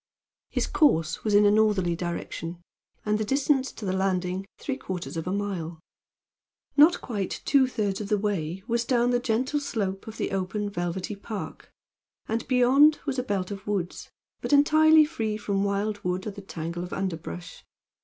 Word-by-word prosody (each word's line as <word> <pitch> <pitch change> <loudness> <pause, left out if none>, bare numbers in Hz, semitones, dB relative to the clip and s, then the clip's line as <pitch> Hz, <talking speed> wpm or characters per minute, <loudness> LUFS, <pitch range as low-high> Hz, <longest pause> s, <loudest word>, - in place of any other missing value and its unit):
His - - 0
course 165 - +2
was 210 -2 +2
in 205 0 +6
a 205 - +6
northerly 205 -5 +3
direction, 170 0 -5 0.5
and 210 0 +1
the - - +1
distance 270 +3 +1
to 215 - -8
the 185 - 0
landing 190 0 -1
three 270 - -3
quarters 185 -10 -5
of 165 +1 -4
a - - -1
mile. 185 -5 -3 1.0
Not 310 +5 +6
quite 205 -6 -4
two 270 -2 +4
thirds 210 -5 -2
of 205 - -5
the 210 - +3
way 190 -3 -2
was 235 0 +1
down 240 0 +2
the 245 - +2
gentle 255 +5 0
slope 200 -9 -3
of 220 0 -8
the - - -2
open, 195 +2 -2
velvety 175 +2 -3
park, 205 +1 -7 0.6
and 225 +1 -2
beyond 270 +4 +5
was 275 -3 -1
a - - -1
belt 200 -4 -2
of 200 0 -7
woods, 190 -4 -3 0.3
but - - -3
entirely 310 +2 +6
free 225 -9 -2
from 200 -2 -1
wildwood 200 -2 -1
or 210 - -3
the 200 0 -10
tangle 170 -2 -5
of 180 - -7
underbrush. 175 -1 -5
205 Hz, 175 wpm, -26 LUFS, 185-245 Hz, 1.0 s, in